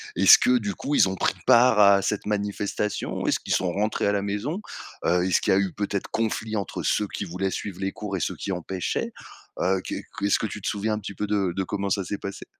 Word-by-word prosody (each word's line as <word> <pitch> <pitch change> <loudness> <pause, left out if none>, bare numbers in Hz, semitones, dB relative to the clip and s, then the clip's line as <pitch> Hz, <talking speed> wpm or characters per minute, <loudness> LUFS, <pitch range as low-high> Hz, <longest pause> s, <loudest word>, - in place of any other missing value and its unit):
Est-ce - - +8
que 125 0 +3
du 100 -3 -3
coup, 145 - -4
ils 100 - +5
ont 95 - -3
pris - - +1
part 120 -2 +6
à 100 -1 +7
cette 105 +1 -2
manifestation? 105 0 -2
Est-ce - - +1
qu'ils - - -1
sont 90 -1 0
rentrés 105 +3 0
à 100 - +3
la 100 -1 0
maison? 105 - -3 0.4
Heu, 90 +1 +3
est-ce 95 - +2
qu'il - - +1
y - - +5
a - - +4
eu 100 -2 0
peut-être 100 -1 -3
conflit 110 0 -1
entre 100 - -4
ceux 105 - +1
qui 100 - -5
voulaient 95 +2 -2
suivre 95 -2 -5
les 95 0 -1
cours 105 -1 -5
et - - -3
ceux 75 - -2
qui 100 - -5
empêchaient? 90 0 -3 0.5
Heu, 95 +1 +1
qu'est - - -5 0.2
qu 100 - -1
est-ce 100 - +3
que - - -1
tu 105 +1 -7
te - - -4
souviens 105 +1 -1
un 105 - -2
petit 100 -1 -7
peu 105 - -2
de 100 -4 0
de 95 - 0
comment 100 +1 -3
ça 100 0 0
s'est 100 +3 -4
passé? 100 0 -7
100 Hz, 255 wpm, -25 LUFS, 95-105 Hz, 0.5 s, Est-ce